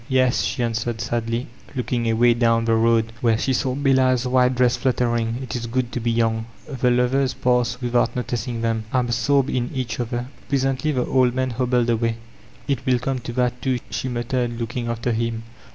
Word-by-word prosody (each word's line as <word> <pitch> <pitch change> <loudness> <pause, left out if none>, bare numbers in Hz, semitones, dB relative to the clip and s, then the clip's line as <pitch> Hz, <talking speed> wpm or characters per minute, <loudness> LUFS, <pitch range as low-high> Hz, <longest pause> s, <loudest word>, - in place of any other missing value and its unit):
"Yes,*' 130 -6 +3
she 110 +7 -1
answered 115 0 -2
sadly, 115 +1 -2 0.3
looking 120 -1 -1
away 120 +2 +4
down 115 -1 +2
the 115 - +2
road 115 0 +2
where 115 -2 +3
she 130 +3 0
saw 130 0 0
Bella's 130 -3 +2
white 125 0 +3
dress 125 0 +3
fluttering, 120 -2 0
"it 130 - -5
is 120 -1 -3
good 125 0 -1
to - - -3
be 120 0 -1
young/' 115 -1 +1 0.2
The 125 -2 0
lovers 125 +2 +2
passed 125 0 +1
without 120 -1 +1
noticing 120 -1 -3
them, 115 -1 -1
absorbed 130 +3 +1
in 125 -1 -1
each 130 -4 -3
other. 120 0 -2 0.2
Presently 135 +2 +1
the 125 -4 0
old 125 -2 +2
man 130 0 0
hobbled 120 0 +1
away. 115 0 0 0.5
"It 135 -3 -1
win 130 -1 +2
come 130 +1 -2
to 120 0 -7
that 125 0 0
too, 130 -2 0
she 130 - -2
muttered 120 0 -2
looking 120 +1 -3
after 115 +1 -1
him. 115 0 -2
120 Hz, 185 wpm, -22 LUFS, 115-130 Hz, 0.5 s, away